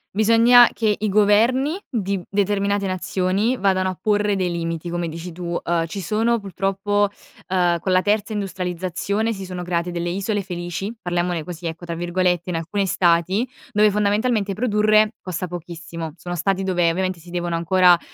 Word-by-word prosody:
Bisogna 230 +3 +6
che 215 -2 +1
i 215 +1 -1
governi 225 - +3
di 200 -5 -1
determinate 200 0 0
nazioni 190 +5 0
vadano 185 -2 +1
a 185 - -6
porre 205 -1 +1
dei 185 -1 0
limiti, 165 0 -3
come 175 -1 -2
dici 165 +2 -7
tu. 170 0 -3
Uhm, 170 -1 0
ci 195 - -6
sono 225 +6 +1
purtroppo, 195 +1 0 0.4
ehm, 175 -2 +2
con 185 +3 -2
la 185 0 +4
terza 210 +2 0
industrializzazione 190 +2 -2
si 195 -2 -7
sono 180 -1 -6
create 175 0 -2
delle 175 0 -3
"isole 200 +3 -1
felici", 180 +3 -5
parliamone 175 -1 -1
così 170 +1 -8
ecco 165 +2 -6
tra 170 -1 -4
virgolette, 175 +1 0
in 175 - -2
alcuni 170 +5 -1
stati, 175 +4 +2 0.3
dove 210 0 +4
fondamentalmente 210 +1 +1
produrre 215 0 +3
costa 185 0 -4
pochissimo. 165 -2 -7
Sono 175 +1 -6
stati 195 +3 0
dove 175 -3 +2
ovviamente 185 +1 -1
si 170 +2 -15
devono 175 -1 -2
ancora, 175 +1 +5
185 Hz, 165 wpm, -22 LUFS, 175-205 Hz, 0.4 s, Bisogna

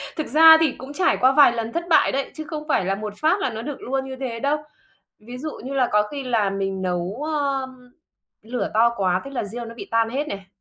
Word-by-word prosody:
thực 310 - -3
ra 320 +1 +8
thì 315 -4 +3
cũng 265 +3 -9
trải 360 +4 +2
qua 260 +1 +4
vài 285 -1 +6
lần 230 -1 -4
thất 340 - -2
bại 325 - +4
đấy, 275 +1 -2
chứ 310 - -6
không 305 -2 -6
phải 275 - +1
là 195 +1 0
một 210 +1 -6
phát 320 +6 +2
là 390 - 0
nó 220 -2 -6
được 285 +3 -6
luôn 265 +1 -2
như 265 0 -7
thế 245 -4 -4
đâu. 285 +4 +1 0.6
Ví 240 +4 -10
dụ 310 +4 -4
như 265 - -5
là 255 -3 +2
có 210 - +4
khi 285 -1 -5
là 225 -5 +1
mình 195 -1 -3
nấu, 180 +6 -3
ờm, 265 -4 -3 0.5
lửa 240 +3 -3
to 230 +2 +5
quá 185 -3 +1
thế 275 - -8
là 255 -5 -3
riêu 235 +4 -6
nó 230 0 -9
bị - - -9
tan 230 0 +1
hết 290 +4 -2
này. 195 -1 -6
250 Hz, 255 wpm, -22 LUFS, 220-285 Hz, 0.6 s, ra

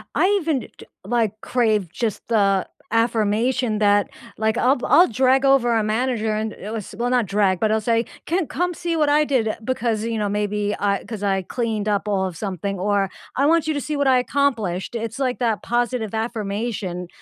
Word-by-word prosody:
I 365 - +4
even 310 -4 0
d - - -10
d - - -12 0.2
like, 220 -3 0
crave 215 -7 +1
just 220 -1 -3
the 200 -4 +2 0.3
affirmation 230 +1 +1
that, 205 -1 +3 0.3
like, 220 +1 0
I'll 260 +3 +3
I'll 355 - +6
drag 260 +3 +2
over 255 -3 +4
a 220 - +1
manager 220 0 0
and 215 0 -2
it 210 - -8
was 210 -2 -6
well, 240 +1 0
not 250 -3 +2
drag, 195 -2 +1
but 215 -1 +2
I'll 220 - +2
say, 230 +1 +1 0.2
"Ken, 345 -1 0
come 355 0 -1
see 335 -1 -2
what 300 -1 +2
I 300 +1 +4
did," 240 -7 0
because, 230 -4 -1
you 230 -1 -2
know, 210 - 0
maybe 205 0 -1
I 200 -1 0
'cause 215 -3 -6
I 195 -1 +1
cleaned 220 -1 -2
up 205 0 0
all 195 -2 +1
of 180 - -7
something, 195 0 -4
or, 195 0 +1 0.3
"I 275 - +3
want 330 +1 +3
you 310 - +1
to 285 - -2
see 300 +2 -3
what 285 -1 +1
I 255 -1 +5
accomplished," 235 -8 -1
it's, 230 +3 -4
like, 255 -2 -1
that 225 -6 0
positive 240 -2 -1
affirmation 210 -4 -3
225 Hz, 200 wpm, -22 LUFS, 205-255 Hz, 0.3 s, I'll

